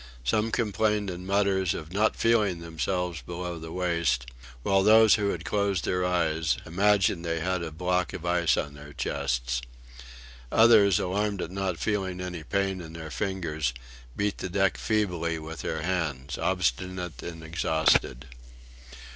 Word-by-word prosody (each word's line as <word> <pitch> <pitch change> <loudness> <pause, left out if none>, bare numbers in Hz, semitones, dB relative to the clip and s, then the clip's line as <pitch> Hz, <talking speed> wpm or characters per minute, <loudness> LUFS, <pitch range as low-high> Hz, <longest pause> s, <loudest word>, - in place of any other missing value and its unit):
Some 105 - +1
complained 105 -2 0
in 90 +1 -7
mutters 95 -2 +2
of 80 +2 -7
"not 105 +2 +2
feeling 110 -6 +2
themselves 85 0 -2
below 85 +5 -5
the 80 0 -8
waist;" 85 -8 0 0.4
while 95 0 +3
those 110 +2 +7
who 105 -2 +2
had 85 -3 -4
closed 100 -4 0
their 90 0 0
eyes, 80 -3 +1
imagined 95 0 +2
they 85 -1 -1
had 90 +2 -1
a 85 - -4
block 90 +3 -1
of 85 - -7
ice 85 -2 +2
on 70 - -2
their 70 0 -11
chests. 60 -4 -1 0.9
Others, 110 -5 +6
alarmed 100 +2 -1
at 80 - -6
not 95 -2 -2
feeling 95 -2 -1
any 90 -2 -5
pain 95 +3 -1
in 80 -1 -10
their 80 -1 -7
fingers, 80 - -2 0.4
beat 100 0 -1
the 95 - -4
deck 95 +1 +2
feebly 90 -7 0
with 80 +1 -7
their 80 0 -3
hands 80 -7 -2
obstinate 90 +6 -1
and 80 -2 -7
exhausted. 80 -5 +1
90 Hz, 150 wpm, -27 LUFS, 80-100 Hz, 0.9 s, those